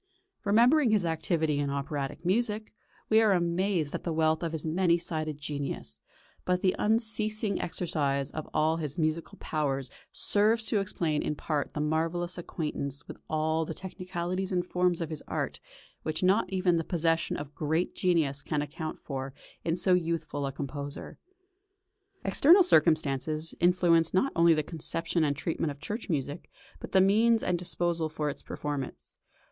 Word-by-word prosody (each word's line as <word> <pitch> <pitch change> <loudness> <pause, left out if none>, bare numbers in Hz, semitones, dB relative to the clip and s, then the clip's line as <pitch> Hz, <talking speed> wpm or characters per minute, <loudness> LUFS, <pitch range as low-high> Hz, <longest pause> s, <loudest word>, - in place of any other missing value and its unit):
Remembering 240 +7 +5
his 210 -4 +3
activity 160 -2 0
in 145 -1 0
operatic 140 +2 -4
music, 215 +2 0 0.4
we 220 +1 +6
are 215 -3 +4
amazed 175 -2 0
at - - -4
the 170 - -2
wealth 160 0 +2
of 165 -2 -2
his 160 -1 -4
many 170 +1 +3
sided 155 -3 -3
genius; 140 - -5 0.4
but 180 0 0
the 185 - +3
unceasing 215 -2 +1
exercise 145 -6 -1
of 155 - -6
all 155 +1 +2
his 150 -3 -4
musical 160 0 -1
powers 135 -4 -2 0.2
serves 220 +2 +2
to 215 - +1
explain 165 -6 -1
in 150 - -2
part 150 -1 -2
that 150 - -1
marvellous 165 +4 -1
acquaintance 150 -4 -4
with - - -8
all 160 +1 +1
the 160 0 -5
technicalities 185 0 -4
and 180 -1 0
forms 180 -1 +1
of 165 -1 -3
his 155 - -4
art - - -3 0.4
which 155 +3 -3
not 190 +1 +3
even 185 -2 +2
the 165 - 0
possession 165 -1 0
of 145 0 -7
great 160 +4 -1
genius 160 -6 +1
can 150 -1 -1
account 155 +2 -5
for 135 -1 -5 0.3
in 165 0 0
so 185 +1 +3
youthful 165 -5 -1
a - - -3
composer. 140 +1 -6 1.1
External 320 - +6
circumstances 155 - +2
influenced 175 -1 +3
not 270 +9 +3
only 170 0 +5
the 155 - 0
conception 165 +2 -1
and 145 -2 0
treatment 160 +2 -1
of 140 -1 -7
church 215 +8 -5
music, 145 0 -3 0.3
but - - -8
the 190 - +5
means 220 +4 +4
at 180 - +1
disposal 170 -2 -1
for 150 -1 -2
its - - -11
performance. 145 -3 -5
165 Hz, 160 wpm, -29 LUFS, 150-185 Hz, 1.1 s, we